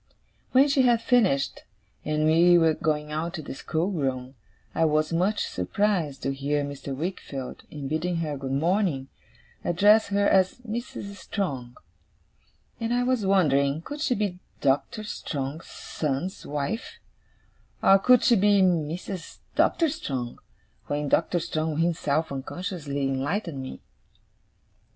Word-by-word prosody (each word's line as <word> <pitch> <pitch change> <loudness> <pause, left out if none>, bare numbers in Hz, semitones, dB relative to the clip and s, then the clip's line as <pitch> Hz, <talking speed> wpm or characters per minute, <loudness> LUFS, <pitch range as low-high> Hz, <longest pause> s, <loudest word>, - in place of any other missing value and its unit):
When 265 +2 +6
she 275 -1 +3
had 240 -2 +4
finished, 210 - +2 0.4
and 155 0 0
we 170 +3 +6
were 165 -2 +4
going 150 -1 -1
out 165 +4 -3
to 160 - -5
the - - -6
schoolroom, 135 -5 -2 0.4
I - - +1
was 155 0 +2
much 190 +5 +1
surprised 160 - -1
to 135 - 0
hear 145 +2 -1
Mr. 140 -1 -5
Wickfield, 140 -4 -5
in 145 -3 -6
bidding 160 +4 -1
her 160 -3 -2
good 135 -1 -5
morning, 160 -2 +1 0.5
address 205 +5 +4
her 200 0 +2
as 190 -1 +3
'Mrs. 215 -3 -5
Strong'; 135 - -4 1.0
and 230 0 -2
I 245 - +2
was 245 -5 +1
wondering 150 -5 +3
could 290 - -7
she 255 - +1
be 200 -4 -2 0.2
Doctor 145 +10 0
Strong's 145 -6 -5
son's 155 +5 -4
wife, 150 - -3 0.9
or 195 0 +7
could 250 +4 +5
she 240 - +5
be 200 0 +4
Mrs. 175 +1 -1 0.2
Doctor 330 - +3
Strong, 135 - -4 0.5
when 145 0 -1
Doctor 175 +4 +2
Strong 155 -2 -2
himself 160 -2 0
unconsciously 145 0 -4
enlightened 140 +4 -1
me. 130 - -8
165 Hz, 130 wpm, -26 LUFS, 140-200 Hz, 1.0 s, or